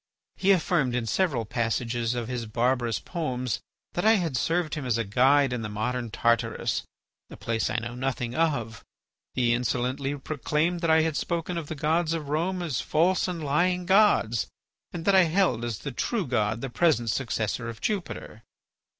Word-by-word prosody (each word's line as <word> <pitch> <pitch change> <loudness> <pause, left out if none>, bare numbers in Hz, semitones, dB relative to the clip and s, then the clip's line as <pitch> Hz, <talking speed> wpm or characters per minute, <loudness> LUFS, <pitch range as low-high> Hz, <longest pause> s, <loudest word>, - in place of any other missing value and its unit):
He 195 - 0
affirmed 155 -8 +2
in 120 -2 -1
several 130 - 0
passages 115 +1 -1
of 120 -2 -3
his 120 -2 -4
barbarous 120 +1 +1
poems 130 - -3 0.3
that 175 - -1
I 220 +1 +6
had 170 -9 -1
served 165 +4 0
him 155 - -3
as 120 -3 0
a 115 - 0
guide 130 +5 +3
in 125 - -2
the 110 - -4
modern 120 +3 -2
Tartarus, 115 +1 0 0.5
a - - -10
place 115 -1 -1
I - - -3
know 120 +1 -4
nothing 125 -1 -2
of. 130 -8 -1 0.5
He 120 -2 +3
insolently 125 +3 -1
proclaimed 155 +4 -1
that 170 - 0
I 160 0 +6
had 160 -2 -1
spoken 170 +1 -2
of 165 -3 -4
the 160 - -5
gods 160 +2 +1
of 155 -4 -4
Rome 175 +4 -1
as 150 -8 -1
false 175 +5 +2
and 175 -3 -4
lying 180 +5 +1
gods, 190 - +3 0.4
and 170 -1 -6
that 200 - +4
I 190 -2 +7
held 165 - +1
as 115 -3 -2
the 140 - -6
true 205 - -1
God 110 -3 0
the 135 - -3
present 120 -6 +2
successor 115 -2 -2
of 115 - -8
Jupiter. 190 - -4
135 Hz, 180 wpm, -27 LUFS, 120-165 Hz, 0.5 s, I